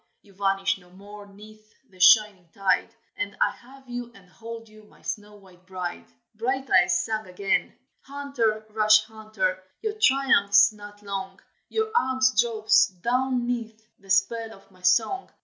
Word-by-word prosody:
You 200 - -21
vanish 195 0 0
no 180 -1 -21
more 205 +2 -13
'neath 215 +2 -17
the 185 -4 -22
shining 195 -2 +5
tide, 195 +4 0 0.2
And 200 0 -5
I - - +3
have 265 +2 -17
you 245 -1 -6
and 195 -2 -18
hold 230 +1 -9
you, 215 0 -17
my - - -23
snow 210 0 -6
white 185 -3 -20
bride!" 180 -2 -6 0.3
Brighteyes 225 -7 +2
sang 220 -2 -3
again: 195 +2 -1 0.2
"Hunter, 270 -7 -2
rash 215 0 +5
hunter, 215 -4 -3 0.2
your 435 -1 -3
triumph's 220 - +4
not 205 0 -13
long, 195 -1 -6 0.3
Your 440 -1 -1
arm 260 - +1 0.2
drops 220 -2 +3
down 245 +6 -1
'neath 230 -3 -4 0.2
the 195 - -20
spell 220 +4 +1
of 195 -1 -19
my 185 -1 -22
song. 225 - +1
215 Hz, 150 wpm, -25 LUFS, 195-235 Hz, 0.3 s, shining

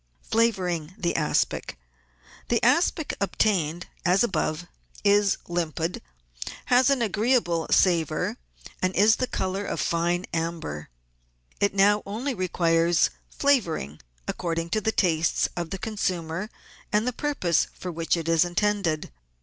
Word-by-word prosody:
Flavouring 185 -7 0
the 170 -1 -1
Aspic. 155 -2 0 0.4
— - - -25
The 235 - +3
aspic 300 +5 +2
obtained 180 -5 0 0.2
as 185 +4 +4
above 175 -5 -1 0.4
is 205 -1 +4
limpid, 170 0 -2 0.7
has 255 +2 +6
an 270 -4 +2
agreeable 210 -6 +1
savour, 170 -5 +2 0.4
and 185 0 0
is 215 +3 +5
the 255 - -1
colour 190 -1 -2
of - - -3
fine 175 +2 0
amber. 165 - -3 0.7
It 200 -1 +1
now 205 +1 +4
only 240 +7 -2
requires 170 -3 +2 0.2
flavouring 175 - 0 0.3
according 165 -1 -2
to 215 - +1
the 220 +1 +1
tastes 165 -5 +2
of 170 -2 -3
the 195 - -4
consumer 185 -3 -3 0.4
and 210 +3 +2
the 250 - 0
purpose 230 - 0
for 180 - -6
which 165 +1 0
it 165 -1 -4
is 165 0 +4
intended. 175 - 0
180 Hz, 130 wpm, -26 LUFS, 165-210 Hz, 0.7 s, has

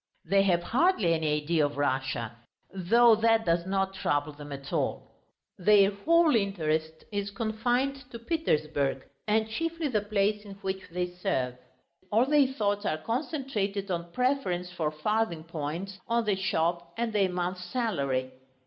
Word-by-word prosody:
They 195 +4 +4
have 175 -3 +2
hardly 240 - +2
any 150 -2 0
idea 160 0 +2
of 145 -1 -1
Russia, 130 -5 -1 0.4
though 230 +6 +5
that 225 0 +3
does 170 +1 +1
not 195 0 0
trouble 145 -5 -1
them 145 0 -10
at 140 0 -7
all. - - -2 0.5
Their 200 +1 +5
whole 320 +9 +3
interest 160 -6 -1
is 200 -1 -2
confined 245 +6 -1
to 235 - -7
Petersburg 155 - 0 0.2
and 220 +1 +2
chiefly 330 +6 -2
the 215 -5 +1
place 205 0 0
in 200 -2 -9
which 190 0 -2
they 180 +1 -1
serve. 130 -8 -1 0.6
All 225 +4 +4
their 290 -1 +4
thoughts 205 -5 -1
are 155 - 0
concentrated 220 - -2
on 170 -1 -3
preference 245 -8 0
for 165 -4 -1
farthing 170 +2 -1
points, 165 +5 -5
on 235 0 +1
the 205 -2 +2
shop, 170 -2 -1
and 230 -1 -1
their 200 -3 +3
month's 180 0 -3
salary. 140 - -1
195 Hz, 150 wpm, -28 LUFS, 160-225 Hz, 0.6 s, though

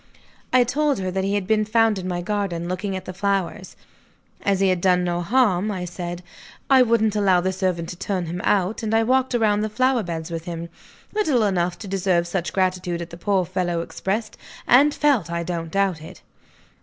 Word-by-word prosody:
I 255 -1 +5
told 285 +4 0
her 185 -1 -3
that 190 +1 -1
he 200 +1 0
had 200 -2 -1
been 215 +1 +2
found 220 -1 +2
in 185 - -5
my 175 -1 -2
garden, 185 -4 -2
looking 190 +2 -3
at 185 - -6
the 185 - -6
flowers. 195 0 -2 0.7
"As 195 -1 +1
he 195 -1 +3
had 180 -2 0
done 180 -1 +3
no 175 0 -1
harm," 210 -1 +2
I 185 -3 -3
said, 175 0 -6 0.5
"I 265 -1 +7
wouldn't 225 -3 +2
allow 195 -3 +3
the 185 +1 -1
servant 180 -3 -1
to - - -6
turn 185 0 -2
him 175 +2 -4
out; 200 +2 +1
and 220 0 -1
I 225 - +4
walked 260 +1 +1
round 210 -3 +2
the 215 - -1
flower 255 +3 +2
beds 170 -3 -5
with 165 0 -5
him. 170 -1 -5 0.4
Little 310 - +2
enough 180 -3 0
to 210 - -9
deserve 185 -3 +1
such 175 -2 -3
gratitude 180 -2 -1
as 170 - -11
the 170 - -9
poor 190 0 +1
fellow 175 -1 -1
expressed 210 +5 -3 0.3
and 280 +5 +6
felt, 280 - +1
I 170 0 -2
don't 170 -1 -4
doubt 195 -3 0
it." 160 - -12
190 Hz, 205 wpm, -23 LUFS, 175-215 Hz, 0.7 s, I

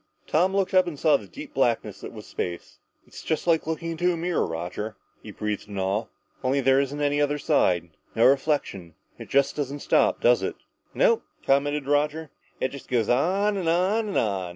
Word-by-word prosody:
Tom 185 +5 +2
looked 195 -1 0
up 185 -1 +5
and 160 -4 -5
saw 155 0 +4
the 105 -8 -3
deep - - -10
blackness - - 0
that - - -7
was - - -10
space. 85 -1 -6 0.3
"It's 160 - -4
like 165 -2 +2
looking 160 +1 -3
into 175 +2 +1
a 170 - -2
mirror, 175 +1 0
Roger," 90 +6 -5 0.3
he - - -11
breathed 105 -1 -4
in 100 -1 -7
awe. 95 +3 -1 0.4
"Only 130 +2 +1
there 135 0 +4
isn't 140 +1 -2
any 145 0 +1
other 145 0 +1
side 90 - +1 0.2
no 115 - +4
reflection. 135 - +1 0.2
It - - -9
just 140 0 +2
doesn't 145 -1 -4
stop, - - +2
does - - +4
it?" - - -3 0.4
"Nope," - - +3 0.2
commented 145 +1 +1
Roger, 150 +2 0 0.3
"it 130 - 0
just 140 0 -10
goes 120 -4 +1
on 195 +11 +2
and 175 -4 -1
on 190 +6 +1
and 200 - -2
on. 95 -4 0
145 Hz, 195 wpm, -25 LUFS, 115-165 Hz, 0.4 s, up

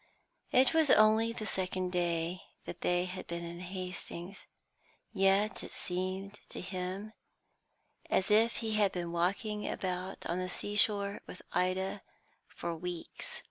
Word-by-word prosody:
It 255 +4 +6
was 320 -3 +4
only 220 +1 +6
the 225 -2 -5
second 185 -2 -1
day 175 0 0 0.2
that 175 - -7
they 180 0 +2
had 185 0 -6
been 170 0 -3
in 170 0 -6
Hastings, 185 0 -6 0.7
yet 195 +1 +3
it - - -7
seemed 185 +2 -3
to - - -5
him 185 +3 -4 1.0
as 190 +2 +2
if 225 +2 +5
he 220 - 0
had 210 -2 +4
been 175 -2 -3
walking 200 +5 0
about 185 0 -3
on 175 +2 -1
the 185 0 -2
seashore 205 +1 +2
with - - -9
Ida 185 +2 +1 0.5
for 170 - -4
weeks. 175 0 -4
185 Hz, 140 wpm, -33 LUFS, 180-205 Hz, 1.0 s, It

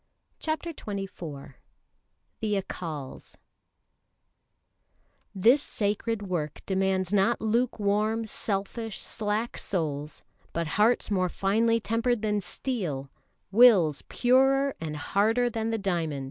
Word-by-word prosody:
CHAPTER 320 +2 -2
XXIV 185 - -7 0.9
The 210 -2 0
Accals 155 -7 -7 2.0
"This 235 +9 +5
sacred 210 -2 -1
work 170 -6 -3
demands 190 -1 0
not 205 +4 +3
lukewarm, 220 -1 +1
selfish, 215 +1 -3
slack 215 +2 -2
souls, 150 -5 -2 0.3
but 170 0 -1
hearts 215 +5 +2
more 185 -2 +2
finely 225 +6 +2
tempered 230 +1 0
than 210 -1 +1
steel, 175 - -3 0.4
wills 195 - +6
purer 270 +2 +3
and 155 -2 -4
harder 225 +9 +1
than 225 0 -2
the 225 - 0
diamond." 170 -8 -1
205 Hz, 100 wpm, -27 LUFS, 180-230 Hz, 2.0 s, wills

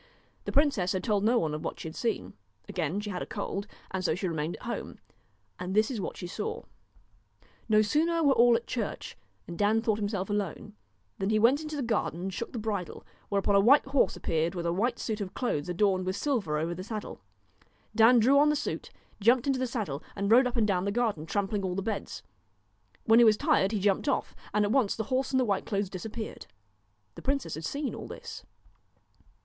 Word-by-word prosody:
The - - -3
princess 275 -11 +2
had 185 - -2
told 205 -2 +1
no 235 +3 +4
one 155 -8 0
of 150 - -4
what - - -4
she - - -6
had 160 - -8
seen. 230 -2 -2 0.3
Again 175 +3 -2
she 205 0 -5
had 180 - -4
a - - -3
cold, 200 -1 -4 0.2
and 190 -1 -2
so 165 - +1
she 185 +1 -2
remained 160 0 -2
at - - -14
home. 235 - -5 0.6
And 180 +2 -4
this 215 +4 +3
is 230 -5 -3
what - - -5
she - - -6
saw: 435 - -4 1.1
No 215 0 +5
sooner 325 +8 +1
were 280 -2 +5
all 240 -1 +5
at 230 - -2
church, 230 - -4 0.3
and 170 - -7
Dan 210 +2 +3
thought 220 -2 0
himself 200 -2 -2
alone, 205 -5 -3 0.5
than 195 - 0
he 215 - +3
went 245 +7 +4
into 310 -1 -5
the 285 - -2
garden 220 -7 -1
and 190 +1 -4
shook 230 - -4
the - - -6
bridle, 210 -5 -4 0.2
whereupon 200 0 +1
a 200 - +6
white 255 +9 +6
horse 270 -1 +2
138 - - -9
appeared 165 +2 -1
with 170 -1 -3
a 170 - +1
white 230 +7 0
suit 215 -2 -3
of 190 -2 -5
clothes 180 - -1
adorned 190 +1 +2
DON'T - - -5
with 185 - -1
silver 205 - 0
over 165 +3 -1
the 185 +2 -6
saddle. 215 +1 -6 0.7
Dan 230 +2 +7
drew 260 +5 +5
on 295 +1 +5
the 300 - +2
suit, 290 - -3
KNOW - - -32
jumped 240 +1 +5
into 270 -2 +1
the 255 - 0
saddle 200 - -3
and 200 +1 -1
rode 250 +3 +7
up 250 0 -4
and 225 - +3
down 185 -2 +1
the 200 - 0
garden 210 -9 -1
trampling 200 +2 -1
all 185 -1 -2
the 195 - -2
beds. 220 -1 -4 0.8
When 225 +1 +6
he - - +8
was 215 -1 +5
tired 190 -1 +2
he 215 - 0
jumped 200 +7 +1
off, - - -1 0.2
and 210 0 +2
at 205 - -1
once 250 -5 +2
the 220 - -2
horse 260 +1 +1
and 260 - +2
the 255 - +2
white 200 -3 -1
clothes 200 -2 -1
disappeared. 220 +4 -6 0.7
The - - -10
princess 275 0 -1
had 160 +1 -5
seen 285 - -3
all - - -7
this. - - -8
210 Hz, 230 wpm, -29 LUFS, 185-240 Hz, 1.1 s, he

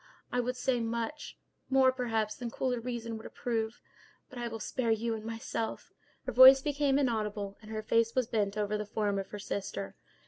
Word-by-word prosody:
I 245 - +1
could 250 +1 -3
say 250 0 +1
much—more, 260 +2 -1
perhaps, 225 -4 -1
than 240 -1 -5
cooler 250 +1 -1
reason 230 -1 -4
would 220 - -11
approve; 225 -1 -3 0.5
but 250 - -8
I 240 - -2
will 225 -1 -5
spare 240 +1 -2
you 225 +1 +1
and 220 -1 -5
myself—" 225 0 -4 0.3
Her 255 - -2
voice 260 +3 +10
became 285 -1 +1
inaudible, 210 -6 -1
and 215 - -13
her 215 0 -4
face 230 +1 +2
was 255 -2 +3
bent 210 -3 -1
over 210 0 0
the 210 - -3
form 205 -2 0
of 195 - -5
her 210 - -6
sister. 100 - -4
230 Hz, 185 wpm, -31 LUFS, 215-250 Hz, 0.5 s, voice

